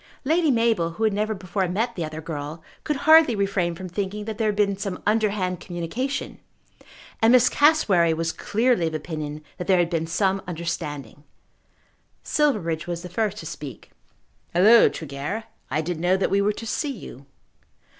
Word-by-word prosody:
Lady 320 +2 +2
Mabel, 230 -9 +2
who 220 - -4
had 215 -2 +3
never 215 +2 -1
before 185 0 -2
met 225 +7 -1
the 175 - -3
other 155 0 -6
girl, 155 0 -6 0.2
could 300 - -1
hardly 315 -6 +7
refrain 195 -4 0
from 185 +2 -7
thinking 200 +3 -4
that 220 0 -6
there 220 - +1
had 210 - 0
been 200 -1 +2
some 195 -2 -4
underhand 205 -4 +1
communication, 195 +12 -4 0.8
and 225 +1 +5
Miss 255 -1 +6
Cassewary 215 - +4
was 165 0 -1
clearly 225 -4 +1
of 160 - -3
opinion 155 -1 -5 0.2
that 180 - -5
there 190 -2 +4
had 175 0 +1
been 165 -1 -1
some 190 +3 +1
understanding. 145 -6 -5 1.0
Silverbridge 175 - 0
was 170 -1 -4
the 180 - -7
first 210 +2 -1
to 165 - -8
speak. 145 -6 -8 0.6
"Halloo, 215 +6 +7
Tregear, 150 +8 -5 0.3
I 150 +4 0
didn't 165 0 -4
know 180 +2 +3
that 190 - 0
we 200 - +3
were 210 +1 +2
to 230 - -8
see 290 +6 -2
you." 140 - -10
190 Hz, 175 wpm, -24 LUFS, 165-220 Hz, 1.0 s, hardly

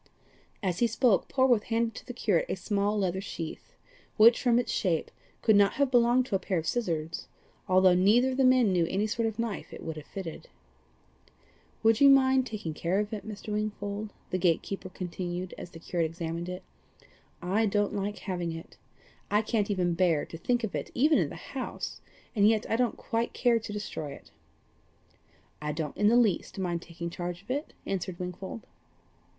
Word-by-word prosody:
As 180 -2 -1
he 235 - +4
spoke 230 -2 +2
Polwarth 255 -5 +3
handed 230 0 0
to - - -10
the - - -4
curate 205 -8 +1
a - - 0
small 205 +2 0
leather 190 -2 0
sheath, 165 -5 -7 0.4
which, 230 +2 +7
from 240 -2 +3
its 245 - 0
shape, 170 -6 0 0.3
could 220 - +5
not 200 -1 +5
have 280 -2 +1
belonged 245 +1 +4
to 230 - -1
a - - +2
pair 185 -2 -1
of 160 - -2
scissors, 165 -7 -2 0.4
although 185 0 +5
neither 215 +8 +4
of 255 - -3
the 270 - +3
men 255 -5 +5
knew 175 -2 +2
any 195 +4 0
sort 225 +1 0
of 220 -1 -4
knife 230 -3 -3
it - - -9
would 160 -1 -5
have 155 - -9
fitted. 185 -5 -7 1.3
"Would 225 +1 +4
you 280 - +9
mind 265 -1 +5
taking 200 -8 -5
care 170 +5 -1
of 210 +1 -2
it, 215 0 -5
Mr. 210 0 -6
Wingfold?" 210 0 -3 0.2
the 185 - 0
gate 170 -2 +2
keeper 195 -1 -6
continued 180 0 -5
as - - -8
the 165 - -12
curate 165 0 -1
examined 165 +1 -4
it; 180 0 -6 0.8
"I 200 +5 +1
don't 205 0 +1
like 205 +1 -2
having 175 -4 -3
it. 165 0 -10 0.5
I 210 +1 +3
can't 215 -2 0
even 180 -3 +1
bear 170 -4 +2
to 165 - -9
think 240 +6 0
of 220 - -2
it - - -3
even 300 +5 +4
in - - +1
the - - -8
house, - - -6 0.3
and 205 0 +5
yet 220 -1 +1
I - - +1
don't 245 0 +1
quite 230 +1 -2
care 240 -2 +3
to 220 -1 -7
destroy 195 -8 -5
it." - - -14 1.3
"I 150 0 -2
don't 150 -1 -4
in 205 - +3
the 235 +3 +5
least 215 -7 +1
mind 175 -3 -1
taking 170 0 -7
charge 175 +1 -5
of 210 - -7
it," 290 +4 -3
answered 185 -2 -3
Wingfold. 180 +4 -6
200 Hz, 195 wpm, -29 LUFS, 175-230 Hz, 1.3 s, you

